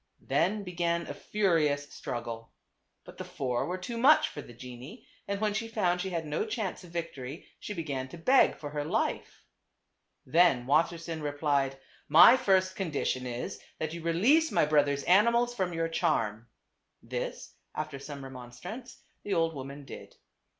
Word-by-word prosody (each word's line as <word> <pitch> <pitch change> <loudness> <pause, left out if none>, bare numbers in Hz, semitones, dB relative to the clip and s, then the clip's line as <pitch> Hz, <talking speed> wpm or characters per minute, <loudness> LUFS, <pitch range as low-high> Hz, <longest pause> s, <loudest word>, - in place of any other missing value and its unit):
Then 190 +10 +1
began 170 -2 -1
a - - -5
furious 155 -8 0
struggle. 115 -1 -6 0.5
But - - -13
the - - -3
four 125 -3 -2
were 180 +2 -2
too 230 +6 -5
much 290 +6 +6
for 145 - -7
the - - -13
genie, 125 - -10 0.2
and 200 0 -2
when 210 -1 +1
she 225 +2 -2
found 180 -6 0
she 190 - -3
had 165 -3 -3
no 150 0 -1
chance 215 -4 -3
of 175 - -12
victory 165 -3 -6
she 210 - -6
began 140 -6 -3
to 150 - -10
beg 260 +11 +4
for 145 -1 -7
her 145 0 -2
life. 150 - -2 0.8
Then 150 -4 +4
Wassersein 165 +3 +1
replied, 145 -2 0 0.2
" - - -34
My 235 - +11
first 190 -7 +2
condition 145 -8 -2
is, 120 0 -5 0.2
that 155 0 -3
you 170 - -6
release 230 - +3
my - - +3
brother's 145 -2 +2
animals 235 +6 +4
from 190 -6 -1
your 165 -1 -1
charm." 115 -10 0 0.6
This, - - -5 0.2
after 140 - -4
some 140 0 -8
remonstrance, 135 - -9 0.2
the 205 - -2
old 165 0 +2
woman 140 0 -8
did. - - -10
165 Hz, 165 wpm, -30 LUFS, 140-190 Hz, 0.8 s, My